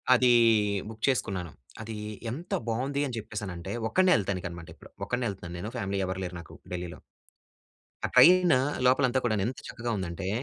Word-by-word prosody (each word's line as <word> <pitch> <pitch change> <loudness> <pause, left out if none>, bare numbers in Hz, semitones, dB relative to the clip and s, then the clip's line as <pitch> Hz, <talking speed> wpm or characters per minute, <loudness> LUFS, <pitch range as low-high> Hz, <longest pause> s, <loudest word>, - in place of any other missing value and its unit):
అది 125 0 +4 0.6
బుక్ 110 0 -11
చేసుకున్నాను. 95 - -1 0.3
అదీ 110 0 -6 0.3
ఎంత 165 +9 -6 0.2
బాగుంది 135 +5 -1
అని 125 - -5
చెప్పేసానంటే, 105 -5 -6 0.2
ఒక్కనే 185 +8 +4
యేళ్తానికనమాట 90 -5 -3
ఇప్పుడు. - - -16
ఒక్కడినే 125 0 -1
యేళ్తున్నాను 90 -3 -7
నేను. 105 +5 -5
ఫ్యామిలీ 100 -1 -2
ఎవరు 95 +1 -3
లేరు 90 0 -6
నాకు 85 - -15 0.2
ఢిల్లీలో. 85 -3 -5 1.1
ఆ - - +4
ట్రైన్ 180 -1 +7 0.3
లోపల 130 +2 +4
అంతా 130 +1 +1
కూడాను 110 -5 +1
ఎంత 130 - -4
చక్కగా 120 -1 -4
ఉందంటే 95 0 -4
110 Hz, 155 wpm, -28 LUFS, 90-125 Hz, 1.1 s, ట్రైన్